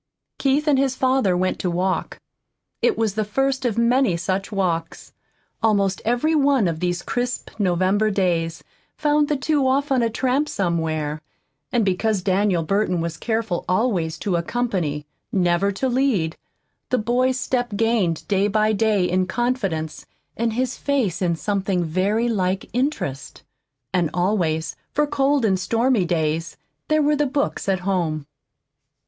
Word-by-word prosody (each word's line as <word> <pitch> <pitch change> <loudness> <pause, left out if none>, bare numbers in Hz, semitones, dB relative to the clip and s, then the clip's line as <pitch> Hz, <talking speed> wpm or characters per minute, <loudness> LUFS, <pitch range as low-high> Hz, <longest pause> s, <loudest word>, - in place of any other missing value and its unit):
Keith 285 +3 +1
and 280 -3 +4
his 270 -1 +1
father 255 -9 +2
went 185 +1 0
to 180 - -1
walk. 185 +2 -1 0.6
It 475 - +2
was 220 -3 0
the 215 +1 0
first 265 +5 -1
of 230 -3 0
many 235 -4 +3
such 190 +4 -2
walks. 170 -5 -2 0.5
Almost 200 -4 +2
every 245 +8 +1
one 280 - +3
of 165 -2 -2
these 175 0 -1
crisp 245 0 -3
November 190 +3 +2
days 170 -4 0 0.3
found 295 -1 +2
the 295 - 0
two 280 0 +1
off 275 +2 +1
on 260 -2 +3
a 230 - +2
tramp 260 +6 0
somewhere. 160 -5 -1 0.5
And 235 -3 +2
because 195 +1 0
Daniel 190 -2 +2
Burton 195 0 0
was 165 0 -3
careful 220 -3 -2
always 180 -6 +1
to 185 -4 0
accompany, 170 -7 -2 0.3
never 180 +1 +2
to 260 +7 -1
lead, 240 -11 +1 0.5
the 255 - +2
boy's 250 +3 +1
step 245 -3 -1
gained 215 -7 +1
day 200 0 +2
by 215 +1 +2
day 210 -3 +2
in 185 +1 +1
confidence 195 -8 -2 0.3
and 230 0 -1
his 255 +2 -1
face 260 - 0
in 175 -2 +1
something 195 0 -1
very 195 +8 0
like 190 -4 -1
interest. 245 - -2 0.5
And 175 -4 +2
always, 175 -4 0 0.2
for 295 - +2
cold 280 -2 +1
and 190 -3 +2
stormy 230 +1 +1
days, 165 -1 -1 0.3
there 310 0 +3
were 300 +1 +3
the 295 0 +1
books 280 -6 -1
at 190 -2 +1
home. 170 -6 -1
205 Hz, 150 wpm, -22 LUFS, 180-250 Hz, 0.6 s, and